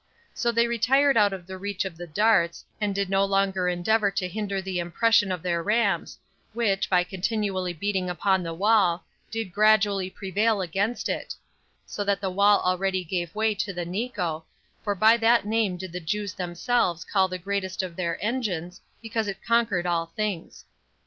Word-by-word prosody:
So 235 Hz, -, 0 dB
they 235 Hz, 0 st, +3 dB
retired 260 Hz, +4 st, +3 dB
out 205 Hz, -2 st, +4 dB
of 190 Hz, -2 st, -7 dB
the 190 Hz, +1 st, -8 dB
reach 200 Hz, -1 st, -3 dB
of 185 Hz, -3 st, -5 dB
the 175 Hz, +1 st, -8 dB
darts, 170 Hz, -1 st, +2 dB, 0.2 s
and 205 Hz, -2 st, 0 dB
did 200 Hz, -1 st, 0 dB
no 195 Hz, +1 st, +2 dB
longer 195 Hz, -2 st, +1 dB
endeavor 200 Hz, +4 st, +2 dB
to 195 Hz, -1 st, -2 dB
hinder 200 Hz, +1 st, -3 dB
the 190 Hz, -1 st, -3 dB
impression 205 Hz, +4 st, +2 dB
of 180 Hz, -3 st, -4 dB
their 170 Hz, -2 st, 0 dB
rams, 215 Hz, +6 st, 0 dB, 0.4 s
which, 215 Hz, -4 st, 0 dB
by 180 Hz, -2 st, +4 dB
continually 190 Hz, 0 st, -2 dB
beating 190 Hz, +1 st, -2 dB
upon 190 Hz, +2 st, +1 dB
the 165 Hz, -1 st, -4 dB
wall, 195 Hz, -2 st, +3 dB, 0.2 s
did 225 Hz, -5 st, -4 dB
gradually 205 Hz, -2 st, +3 dB
prevail 205 Hz, +3 st, 0 dB
against 195 Hz, +6 st, -1 dB
it; -, -, -4 dB, 0.5 s
so 205 Hz, -, -4 dB
that 200 Hz, -1 st, +1 dB
the 195 Hz, -2 st, -2 dB
wall 200 Hz, +2 st, +4 dB
already 185 Hz, +1 st, 0 dB
gave 175 Hz, 0 st, -3 dB
way 220 Hz, 0 st, +2 dB
to 195 Hz, 0 st, -3 dB
the 175 Hz, -1 st, -4 dB
Nico, 180 Hz, -5 st, -3 dB, 0.4 s
for 205 Hz, -1 st, -1 dB
by 220 Hz, +4 st, +5 dB
that 230 Hz, -1 st, +3 dB
name 215 Hz, -4 st, 0 dB
did 185 Hz, 0 st, -7 dB
the 180 Hz, -, -4 dB
Jews 200 Hz, +4 st, -3 dB
themselves 180 Hz, +1 st, -1 dB
call 190 Hz, -2 st, +2 dB
the 185 Hz, 0 st, -5 dB
greatest 190 Hz, 0 st, -3 dB
of 180 Hz, -2 st, -6 dB
their 170 Hz, -2 st, -2 dB
engines, 185 Hz, -7 st, -3 dB, 0.2 s
because 225 Hz, -1 st, -2 dB
it 195 Hz, -1 st, -5 dB
conquered 230 Hz, -7 st, +2 dB
all 170 Hz, -1 st, 0 dB
things. 210 Hz, -6 st, -4 dB
195 Hz, 180 wpm, -26 LUFS, 180-215 Hz, 0.5 s, by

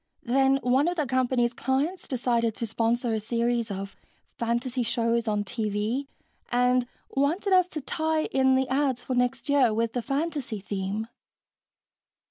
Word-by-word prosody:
Then 270 Hz, +2 st, +3 dB
one 260 Hz, +5 st, +3 dB
of 350 Hz, -, 0 dB
the 305 Hz, -4 st, 0 dB
company's 250 Hz, -1 st, +1 dB
clients 275 Hz, +9 st, -1 dB
decided 235 Hz, -3 st, 0 dB
to 230 Hz, -, -3 dB
sponsor 230 Hz, +2 st, 0 dB
a 220 Hz, -, 0 dB
series 235 Hz, +1 st, 0 dB
of 195 Hz, 0 st, -5 dB, 0.4 s
fantasy 240 Hz, +2 st, -1 dB
shows 230 Hz, 0 st, 0 dB
on 210 Hz, -1 st, +1 dB
TV 215 Hz, +5 st, -2 dB, 0.4 s
and 250 Hz, 0 st, +3 dB, 0.2 s
wanted 330 Hz, +9 st, +1 dB
us 365 Hz, -1 st, +5 dB
to 310 Hz, -4 st, -5 dB
tie 315 Hz, +2 st, 0 dB
in 265 Hz, 0 st, +3 dB
the 260 Hz, 0 st, +1 dB
ads 265 Hz, -2 st, 0 dB
for 260 Hz, -, -3 dB
next 250 Hz, 0 st, 0 dB
year 270 Hz, -6 st, +3 dB
with 230 Hz, 0 st, 0 dB
the 245 Hz, -, -1 dB
fantasy 275 Hz, -4 st, -2 dB
theme. 200 Hz, +2 st, -3 dB
245 Hz, 150 wpm, -27 LUFS, 230-270 Hz, 0.4 s, us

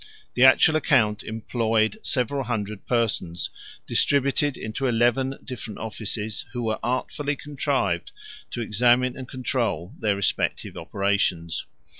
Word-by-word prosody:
The 125 Hz, -, +3 dB
actual 155 Hz, +4 st, +7 dB
account 105 Hz, -8 st, +3 dB
employed 110 Hz, -, 0 dB
several 135 Hz, -, -1 dB
hundred 105 Hz, -4 st, -3 dB
persons, 105 Hz, -8 st, 0 dB, 0.3 s
distributed 140 Hz, 0 st, +2 dB
into 110 Hz, +5 st, -3 dB
eleven 120 Hz, +3 st, +2 dB
different 115 Hz, -5 st, -7 dB
offices, 110 Hz, 0 st, -4 dB
which 120 Hz, -, -3 dB
were 110 Hz, -1 st, -1 dB
artfully 140 Hz, +4 st, -1 dB
contrived 140 Hz, -, -1 dB, 0.4 s
to 120 Hz, -, -4 dB
examine 120 Hz, +3 st, +3 dB
and 130 Hz, -2 st, -7 dB
control 120 Hz, -, -2 dB
their 105 Hz, -2 st, +1 dB
respective 100 Hz, -, 0 dB
operations. 90 Hz, -5 st, -1 dB
115 Hz, 115 wpm, -25 LUFS, 105-130 Hz, 0.4 s, actual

